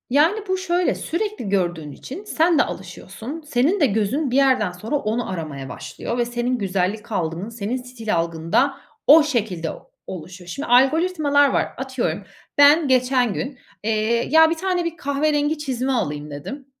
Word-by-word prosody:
Yani, 310 - +3
bu 375 0 0
şöyle, 360 -1 0
sürekli 400 - -3
gördüğün 175 -6 -1
için 280 - -9
sen 335 -5 +2
de - - +6
alışıyorsun. 280 +9 -7
Senin 290 +10 +2
de 295 - +5
gözün 240 +5 0
bir - - 0
yerden 260 -8 +3
sonra 210 +10 -4
onu 235 -3 -1
aramaya 155 -7 -5
başlıyor 235 - -5
ve 240 - +1
senin 240 +1 -1
güzellik 200 +2 -2
algın, 175 +1 -2
senin 230 +1 -3
stil 230 -5 -3
algın 165 -1 -3
da - - +4 0.3
o 310 +2 +9
şekilde 210 - -1 0.4
oluşuyor. 180 +1 -8
Şimdi, 275 - -5
algoritmalar 285 +2 +4
var. - - +1
Atıyorum 260 -1 -2 0.3
ben 290 +2 +6
geçen 250 -3 +2
gün, 265 +3 -5 0.2
eee, 220 +2 +1
ya, 320 +1 +6
1 330 - 0
tane 360 +1 -1
bir 335 0 -3
kahverengi 295 +1 0
çizme 265 -3 -2
alayım 150 - -2
dedim. 265 - -7
250 Hz, 160 wpm, -22 LUFS, 200-300 Hz, 0.4 s, o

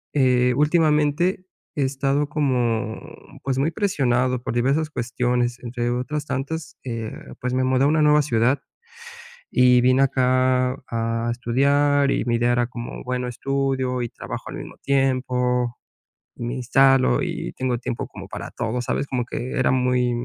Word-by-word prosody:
Eh, 125 -2 +3
últimamente, 155 +3 +2 0.3
he 145 - +1
estado 140 +2 0
como, 125 -6 0 0.4
pues, 135 -1 -1
muy 150 +4 +1
presionado 130 - +1
por - - -3
diversas 140 +6 +1
cuestiones, 125 -1 -1
entre 120 0 -2
otras 135 +4 -3
tantas, 145 +3 -4
eh, 115 -3 -4 0.3
pues, 125 0 -2
me 130 - +1
mudé 130 +1 +2
a - - +5
una 155 +1 +2
nueva 150 0 +5
ciudad 125 0 +1 0.9
y 125 -1 +5
vine 130 +2 +4
acá 130 -1 +2
a 115 0 -1
estudiar 140 +4 +2
y - - 0
mi 120 -1 +1
idea 120 +1 +2
era 120 0 +2
como 120 -1 -7
bueno 125 0 -2
estudio 135 0 -1
y 120 - -2
trabajo - - -7
al - - -7
mismo - - -8
tiempo, 125 -2 +1 0.6
me 120 +2 -4
instalo 130 - +3
y - - -4
tengo 130 -2 -1
tiempo 125 0 -4
como - - -10
para - - -7
todo, 120 +1 -2
¿sabes? 140 - -2
Como 125 -3 -1
que 120 +1 -5
era 130 - +2
muy, 125 -1 +2
130 Hz, 155 wpm, -23 LUFS, 120-140 Hz, 0.9 s, a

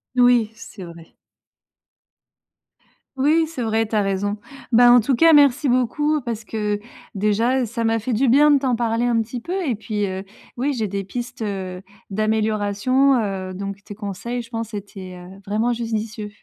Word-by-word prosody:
Oui, 245 -3 +4
c'est 210 -3 -11
vrai. 170 -1 -13 2.0
Oui, 310 +4 +3
c'est 310 -6 -5
vrai, 225 0 0
tu 220 - -4
as 210 - +3
raison. 200 +1 -1 0.3
Bah, 240 +1 +7
en 245 - +8
tout 255 +4 +1
cas, 325 +5 +6
merci 285 -1 +5
beaucoup 295 +5 +1
parce 230 -3 -5
que, 210 -2 -2 0.4
déjà, 220 +6 +1
heu, - - 0
ça 230 +1 -4
m'a 225 0 +2
fait 225 +3 -3
du 250 +4 +2
bien 295 +5 +6
de 285 - +5
t'en 260 -3 +1
parler 230 0 0
un 235 -1 +2
petit 240 +3 -6
peu 360 +8 -3
et 265 - +1
puis, 210 -1 -3
heu, 190 0 -4 0.3
oui, 275 +4 -1
j'ai 220 -3 -1
des 200 0 -3
pistes, 240 +5 -6
heu, 190 -3 -4 0.3
d'amélioration, 215 +5 +1
heu, 190 -3 -3
donc 195 +1 -6
tes 205 - -9
conseils, 215 +5 -5
je 230 - -16
pense, 225 -1 -4
étaient, 195 -2 -8
heu, 180 +2 -12
vraiment 220 +4 +1
judicieux. 220 -2 -4
225 Hz, 180 wpm, -21 LUFS, 205-245 Hz, 2.0 s, en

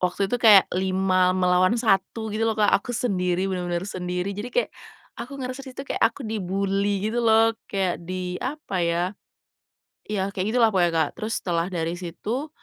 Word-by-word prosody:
waktu 185 +3 -1
itu 245 - 0
kayak 210 -4 +8
5 185 0 +2
melawan 185 +4 +3
1 220 0 0
gitu 225 +1 0
loh, 220 - -1
Kak, 210 -1 +3
aku 240 +3 +1
sendiri, 185 -6 0
bener-bener 175 0 -2
sendiri, 180 0 -3
jadi 205 +5 -5
kayak - - 0 0.5
aku 275 +3 -7
ngerasa 255 0 -5
di 270 - -10
situ 275 - -5
kayak - - -4
aku 240 +3 -10
di-bully 200 0 -1
gitu 240 - 0
loh 225 0 +4 0.2
kayak 190 -3 -1
di 180 +1 -5
apa 260 - -3
ya 170 0 +1 1.1
iya 200 -1 -2
kayak 195 +1 -2
gitulah 225 -3 +4
pokoknya, 175 -3 +3
Kak. 160 -2 +2
Terus 220 +1 -2
setelah 170 -1 0
dari 165 -2 -2
situ, 225 - -4
195 Hz, 175 wpm, -24 LUFS, 180-225 Hz, 1.1 s, kayak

